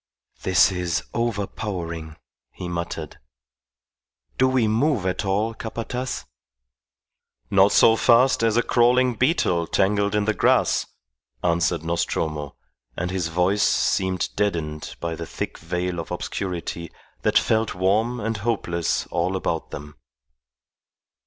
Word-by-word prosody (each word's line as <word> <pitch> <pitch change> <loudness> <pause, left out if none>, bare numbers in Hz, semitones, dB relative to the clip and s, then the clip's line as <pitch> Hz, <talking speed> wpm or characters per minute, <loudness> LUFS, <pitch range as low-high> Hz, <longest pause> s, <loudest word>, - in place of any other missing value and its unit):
"This 95 +1 +4
is 90 -2 -1
overpowering," 95 -8 -3 0.3
he 90 - -7
muttered. 85 -3 -5 1.2
"Do 130 - +5
we 130 -4 +2
move 115 - +1
at 95 +2 -1
all, 105 +4 0
Capataz?" 120 +3 -4 1.3
"Not - - +5
so 110 - +6
fast 125 +3 +4
as 115 0 +2
a 120 - +4
crawling 125 +1 +3
beetle 110 - +1
tangled 100 +1 +1
in 105 -1 +1
the 110 - +2
grass," - - +2 0.6
answered 85 -1 +1
Nostromo, 80 -3 -2 0.4
and 90 +1 -2
his 90 -3 -1
voice 90 +5 +1
seemed 95 -2 +1
deadened 80 -7 -2
by 85 -1 -3
the 80 0 -6
thick - - -5
veil 90 +2 -3
of 80 - -6
obscurity 85 -3 -4 0.3
that - - +3
felt 110 0 +1
warm 110 +7 +1
and 115 0 -2
hopeless 100 -6 -1
all 90 +3 0
about 85 -3 -2
them. 75 0 -9
95 Hz, 120 wpm, -23 LUFS, 85-110 Hz, 1.3 s, so